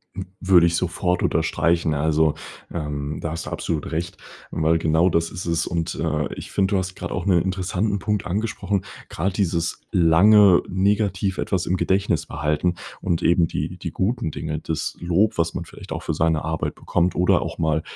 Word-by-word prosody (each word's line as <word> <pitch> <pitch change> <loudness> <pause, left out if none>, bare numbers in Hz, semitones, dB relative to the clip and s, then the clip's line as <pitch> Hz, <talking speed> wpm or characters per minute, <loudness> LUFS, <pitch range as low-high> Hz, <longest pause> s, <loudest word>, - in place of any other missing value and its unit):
W 95 - -5 0.2
würde 85 -3 +7
ich 85 - 0
sofort 90 +1 0
unterstreichen. 85 -1 +1
Also, 80 +1 +2 0.4
ähm, 75 -2 -4
da 80 - -3
hast 80 - -5
du - - -3
absolut 80 -3 -3
recht, 85 +3 -3 0.3
weil 80 +1 +2
genau 80 +2 +3
das 85 -1 0
ist 90 - -6
es. 85 0 +1
Und, 85 -1 -2
äh, - - -1
ich - - -9
finde, 95 +1 +1
du - - +3
hast 95 0 -3
grade - - -5
auch - - -3
'nen 90 -4 +4
interessanten 95 +2 -1
Punkt 105 +2 -1
angesprochen, 100 0 -2 0.2
grad 95 +4 -2
dieses 85 -4 -1
lange 95 +3 +6
negativ 95 0 0
etwas 95 -2 -1
im 95 - 0
Gedächtnis 95 -4 +1
behalten 75 +5 0 0.3
und 85 -3 -1
eben 85 -1 +4
die - - -4
die - - -5
guten 110 0 -1
Dinge, 75 +1 -4
das 80 -1 -3
Lob, 90 +5 +1
was 85 0 +1
man - - -4
vielleicht - - -12
auch - - -4
für - - -2
seine 80 -1 +1
Arbeit 80 0 -2
bekommt 90 +1 0
oder 90 - +3
auch - - -5
mal 80 -1 +1
85 Hz, 185 wpm, -23 LUFS, 80-95 Hz, 0.4 s, würde